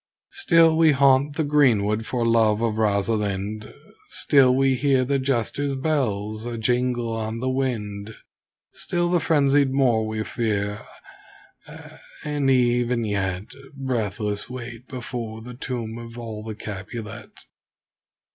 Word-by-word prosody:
Still 165 Hz, -, +4 dB
we 160 Hz, -2 st, +5 dB
haunt 140 Hz, +1 st, +3 dB
the 160 Hz, -, 0 dB
greenwood 115 Hz, -7 st, +2 dB
for 120 Hz, -2 st, -1 dB
love 110 Hz, -2 st, +3 dB
of 110 Hz, -1 st, -1 dB
Rosalind, 105 Hz, 0 st, -1 dB, 0.4 s
Still 130 Hz, -3 st, +4 dB
we 135 Hz, 0 st, +3 dB
hear 130 Hz, -1 st, +2 dB
the 140 Hz, +1 st, +1 dB
Jester's 135 Hz, +2 st, -1 dB
bells 110 Hz, -8 st, -1 dB
ajingle 120 Hz, 0 st, -1 dB
on 110 Hz, 0 st, -3 dB
the 130 Hz, +2 st, -1 dB
wind, 110 Hz, -5 st, -3 dB, 0.6 s
Still 175 Hz, 0 st, -1 dB
the 175 Hz, -, +3 dB
frenzied 145 Hz, -3 st, +3 dB
Moor 120 Hz, -5 st, +2 dB
we 110 Hz, 0 st, -3 dB
fear 105 Hz, -3 st, -2 dB, 0.8 s
Ah! -, -, -13 dB, 0.2 s
and 145 Hz, -2 st, 0 dB
even 120 Hz, -2 st, +2 dB
yet 95 Hz, -2 st, -2 dB, 0.2 s
Breathless 110 Hz, -6 st, -2 dB
wait 120 Hz, -1 st, -8 dB
before 120 Hz, -4 st, -6 dB
the 125 Hz, +1 st, -9 dB
tomb 120 Hz, -2 st, -5 dB
of 115 Hz, 0 st, -10 dB
all 110 Hz, -3 st, -6 dB
the 110 Hz, -1 st, -6 dB
Capulet. 105 Hz, +1 st, -8 dB
120 Hz, 125 wpm, -23 LUFS, 110-135 Hz, 0.8 s, we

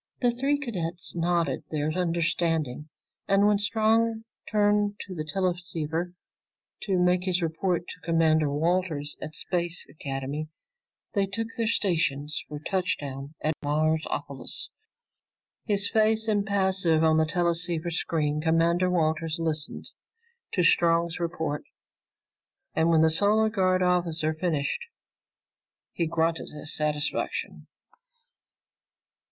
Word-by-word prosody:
The 245 Hz, -1 st, +3 dB
three 270 Hz, +4 st, +1 dB
cadets 180 Hz, -, -3 dB
nodded 170 Hz, -1 st, 0 dB
their 155 Hz, 0 st, -1 dB
understanding, 165 Hz, -4 st, 0 dB, 0.4 s
and 195 Hz, +1 st, +4 dB
when 210 Hz, -1 st, +4 dB
Strong 225 Hz, +1 st, +2 dB, 0.3 s
turned 205 Hz, -1 st, +2 dB
to 190 Hz, -, -8 dB
the 155 Hz, -3 st, -3 dB
teleceiver 175 Hz, -1 st, -2 dB, 0.7 s
to 195 Hz, -3 st, +1 dB
make 180 Hz, 0 st, +2 dB
his 180 Hz, -2 st, +1 dB
report 170 Hz, +2 st, -1 dB
to 180 Hz, -, -9 dB
Commander 160 Hz, -2 st, +3 dB
Walters 160 Hz, -1 st, 0 dB
at 155 Hz, 0 st, -6 dB
Space 175 Hz, -1 st, -1 dB
Academy, 140 Hz, +1 st, -4 dB, 0.7 s
they 200 Hz, -2 st, +2 dB
took 225 Hz, +3 st, -2 dB
their 230 Hz, -3 st, 0 dB
stations 155 Hz, -8 st, 0 dB
for 150 Hz, -, -6 dB
touchdown 145 Hz, -5 st, -3 dB
at 155 Hz, -, +1 dB
Marsopolis. 155 Hz, +2 st, -1 dB, 1.0 s
His 200 Hz, -2 st, +2 dB
face 220 Hz, +1 st, +2 dB
impassive 190 Hz, -6 st, +2 dB
on 160 Hz, 0 st, +4 dB
the 160 Hz, -, +4 dB
teleceiver 170 Hz, 0 st, 0 dB
screen, 150 Hz, -2 st, -1 dB
Commander 170 Hz, +3 st, +2 dB
Walters 160 Hz, -1 st, 0 dB
listened 160 Hz, -2 st, -2 dB, 0.6 s
to 180 Hz, -, +2 dB
Strong's 170 Hz, 0 st, +3 dB
report, 160 Hz, -4 st, -2 dB, 1.1 s
and 160 Hz, +1 st, +2 dB
when 160 Hz, -1 st, +5 dB
the 160 Hz, -, +5 dB
Solar 210 Hz, +6 st, +4 dB
Guard 185 Hz, -3 st, +2 dB
officer 170 Hz, -3 st, +1 dB
finished, 155 Hz, -, -1 dB, 1.1 s
he 170 Hz, -, 0 dB
grunted 165 Hz, 0 st, 0 dB
his 150 Hz, 0 st, -4 dB
satisfaction. 150 Hz, -1 st, -2 dB
170 Hz, 115 wpm, -27 LUFS, 155-190 Hz, 1.1 s, when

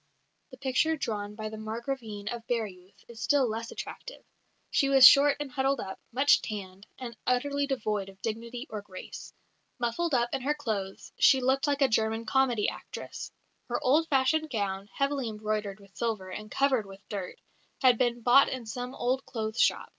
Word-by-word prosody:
The 260 Hz, -, -12 dB
picture 270 Hz, +5 st, +1 dB
drawn 210 Hz, -5 st, -3 dB
by 215 Hz, 0 st, -5 dB
the 215 Hz, 0 st, -8 dB
Margravine 220 Hz, -1 st, -5 dB
of 235 Hz, -1 st, -6 dB
Baireuth 200 Hz, -6 st, -4 dB
is 230 Hz, -1 st, -11 dB
still 280 Hz, 0 st, +3 dB
less 225 Hz, +1 st, -4 dB
attractive: -, -, -8 dB, 0.5 s
"She 275 Hz, -, +2 dB
was 270 Hz, -2 st, +10 dB
short 285 Hz, 0 st, +6 dB
and 290 Hz, -2 st, -5 dB
huddled 270 Hz, 0 st, +1 dB
up, 190 Hz, -2 st, -6 dB
much 270 Hz, +4 st, +4 dB
tanned, 195 Hz, -2 st, -7 dB
and 240 Hz, -2 st, -7 dB
utterly 280 Hz, +3 st, +1 dB
devoid 215 Hz, -7 st, -2 dB
of 195 Hz, 0 st, -16 dB
dignity 235 Hz, +3 st, -4 dB
or 215 Hz, -1 st, -4 dB
grace. 190 Hz, -2 st, -9 dB, 0.5 s
Muffled 260 Hz, +6 st, 0 dB
up 240 Hz, -1 st, +2 dB
in -, -, -1 dB
her 290 Hz, +4 st, 0 dB
clothes, 210 Hz, -9 st, -4 dB
she 265 Hz, -, +6 dB
looked 265 Hz, +2 st, +1 dB
like 285 Hz, -1 st, +2 dB
a -, -, +6 dB
German 220 Hz, 0 st, 0 dB
comedy 245 Hz, -3 st, +2 dB
actress. -, -, -6 dB, 0.4 s
Her -, -, -1 dB
old 305 Hz, +6 st, +3 dB
fashioned 295 Hz, +3 st, +2 dB
gown, 200 Hz, -4 st, -3 dB
heavily 275 Hz, -2 st, -1 dB
embroidered 210 Hz, -2 st, -3 dB
with 200 Hz, -1 st, -19 dB
silver, 215 Hz, -5 st, -2 dB
and 215 Hz, +3 st, -7 dB
covered 260 Hz, -6 st, +1 dB
with 195 Hz, 0 st, -13 dB
dirt, 195 Hz, -3 st, -6 dB, 0.4 s
had 250 Hz, -3 st, +6 dB
been 240 Hz, -1 st, +1 dB
bought 250 Hz, +4 st, +6 dB
in 255 Hz, -3 st, -5 dB
some 245 Hz, +3 st, -5 dB
old 255 Hz, +2 st, 0 dB
clothes 220 Hz, -1 st, -2 dB
shop. -, -, +2 dB
235 Hz, 175 wpm, -29 LUFS, 215-270 Hz, 0.5 s, was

